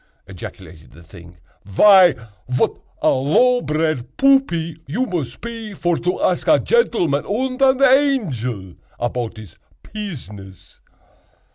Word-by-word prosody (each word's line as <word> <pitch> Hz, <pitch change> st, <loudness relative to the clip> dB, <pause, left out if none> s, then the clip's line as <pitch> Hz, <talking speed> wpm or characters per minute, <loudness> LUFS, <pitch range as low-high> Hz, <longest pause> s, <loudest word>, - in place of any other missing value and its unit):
ejaculated 90 Hz, -3 st, -11 dB
the 85 Hz, +3 st, -16 dB
thing, 85 Hz, +1 st, -15 dB, 0.3 s
"vy 180 Hz, -, +6 dB, 0.4 s
vat 125 Hz, -, +1 dB, 0.3 s
a -, -, +4 dB
low 245 Hz, -, +2 dB
bred 155 Hz, -, -2 dB
buppy 175 Hz, -, +2 dB
you 230 Hz, -, -1 dB
mos 170 Hz, -, -4 dB
pe 230 Hz, -3 st, -8 dB
vor 175 Hz, -2 st, 0 dB
to 180 Hz, +1 st, -2 dB
ask 180 Hz, -, 0 dB
a -, -, +6 dB
gentleman 175 Hz, -, +1 dB
und 255 Hz, +5 st, -2 dB
an 265 Hz, -1 st, +4 dB
angel 160 Hz, -, +1 dB, 0.3 s
apout 120 Hz, -1 st, -3 dB
his 105 Hz, -6 st, -13 dB, 0.3 s
pizziness!" 105 Hz, -, -10 dB
165 Hz, 120 wpm, -19 LUFS, -, 0.4 s, vy